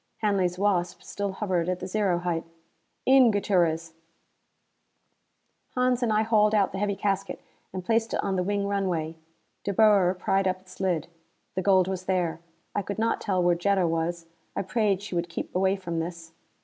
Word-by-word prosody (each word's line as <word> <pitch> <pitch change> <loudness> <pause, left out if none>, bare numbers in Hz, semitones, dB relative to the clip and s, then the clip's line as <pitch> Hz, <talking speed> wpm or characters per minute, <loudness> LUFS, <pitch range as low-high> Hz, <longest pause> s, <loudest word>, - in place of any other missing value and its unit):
Hanley's 190 -4 +1
Wasp 185 -3 0
still 200 -1 -4
hovered 185 -4 -1
at 180 0 -1
the - - -5
zero 195 -2 +1
height. 175 -2 -2 0.6
"In, 260 -2 +7
Gutierrez." 170 -6 +1 1.8
Hans 250 0 +2
and 240 -3 +1
I 215 +1 +3
hauled 215 -1 +3
out 200 -2 +3
the 190 - -4
heavy 205 -1 0
casket 195 -1 -2 0.3
and 185 -1 -6
placed 225 +1 +1
it - - -1
on 195 - 0
the 185 - +1
wing 200 +2 -1
runway. 180 -5 -1 0.5
De 200 - -1
Boer 200 -3 +4
pried 195 +1 +1
up 185 0 0
its 185 0 -16
lid. 180 -5 0 0.5
The 185 - -1
gold 190 -1 +4
was 185 -1 -4
there. 175 -4 0 0.3
I 205 - 0
could 200 +1 -5
not 225 +1 0
tell 185 -3 0
where 175 0 +4
Jetta 190 +2 +2
was; 165 +1 -2 0.3
I 195 - -1
prayed 205 -1 0
she 205 - -7
would 170 0 -1
keep 170 - -6
away 190 +1 +3
from 170 -4 -4
this. 165 0 -6
190 Hz, 180 wpm, -27 LUFS, 175-205 Hz, 1.8 s, In